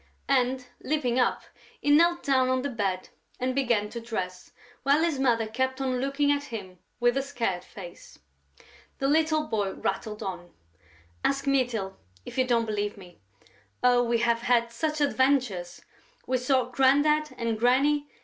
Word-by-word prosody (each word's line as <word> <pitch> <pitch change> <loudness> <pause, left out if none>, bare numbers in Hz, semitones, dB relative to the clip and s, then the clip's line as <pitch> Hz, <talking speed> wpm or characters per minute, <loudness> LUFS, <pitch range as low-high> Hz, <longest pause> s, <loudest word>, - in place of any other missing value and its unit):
And, 255 -1 +1
leaping 260 -4 0
up, 250 - +1 0.4
he 290 - +1
knelt 340 +3 +4
down 260 -2 +2
on 255 0 +1
the 285 - -2
bed 195 -5 -2 0.3
and 255 +1 0
began 240 -6 +1
to 235 - -6
dress, 185 -6 -5 0.3
while 285 +4 +3
his 325 -5 0
mother 235 -4 +2
kept 260 +4 -2
on 255 -2 -1
looking 275 +2 +1
at 285 0 0
him 190 -6 -8 0.2
with 240 +2 +2
a - - +2
scared 230 -10 -2
face. 175 -4 -12 0.8
The 270 - 0
little 310 +1 +2
boy 205 -6 -1
rattled 210 +2 -3
on: 175 -3 -7 0.7
"Ask 275 0 0
Mytyl, 240 -8 0 0.3
if - - -9
you 255 - +3
don't 235 -2 +2
believe 205 -1 -2
me.... 180 -3 -14 0.6
Oh, 245 -1 +5
we 235 -1 +1
have 235 0 +2
had 235 -1 +2
such 305 +6 -2
adventures!... 260 -11 +1 0.4
We 255 0 0
saw 255 -1 +1
Grandad 290 +4 +3
and 230 -2 -2
Granny... 285 +5 +3
250 Hz, 160 wpm, -27 LUFS, 220-275 Hz, 0.8 s, Oh